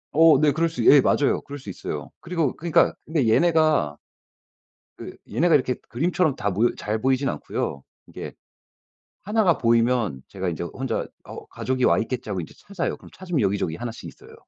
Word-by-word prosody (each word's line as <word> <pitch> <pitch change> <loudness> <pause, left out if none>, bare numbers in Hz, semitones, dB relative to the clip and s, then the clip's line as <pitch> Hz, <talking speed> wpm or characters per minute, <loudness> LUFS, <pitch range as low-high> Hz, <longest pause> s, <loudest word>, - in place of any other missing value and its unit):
어 160 -3 +6
네 150 -1 +4
그럴 165 +2 +1
수 165 - -3
예. 140 -2 +8
맞아요. 145 - +2
그럴 145 +1 -8
수 105 - -10
있어요. - - -6
그리고 165 -6 -1
그니까 165 0 +2
근데 150 -6 0
얘네가 155 - +3 1.0
그 - - -8 0.2
얘네가 160 +8 +3
이렇게 130 -2 +1
그림처럼 160 +3 0
다 100 0 -1
모여 110 +6 +2
잘 110 +1 -3
보이진 135 +1 +1
않고요. 70 - -4 0.2
이게 - - -8 0.9
1 215 +2 +1
가 175 -4 +3
보이면 115 - +1
제가 95 -2 -4
인제 85 0 -3
혼자 130 +9 -3 0.2
'어우 - - -10
가족이 130 -1 -2
와 - - +4
있겠지.' 120 0 -3
하고 95 -3 -2
인제 80 - -9
찾아요. 185 -3 -4
그럼 - - -16
찾으면 180 -6 -3
여기저기 95 -5 0
1 120 +3 -5
씩 - - -11
있어요. - - -15
130 Hz, 365 characters per minute, -24 LUFS, 110-160 Hz, 1.0 s, 예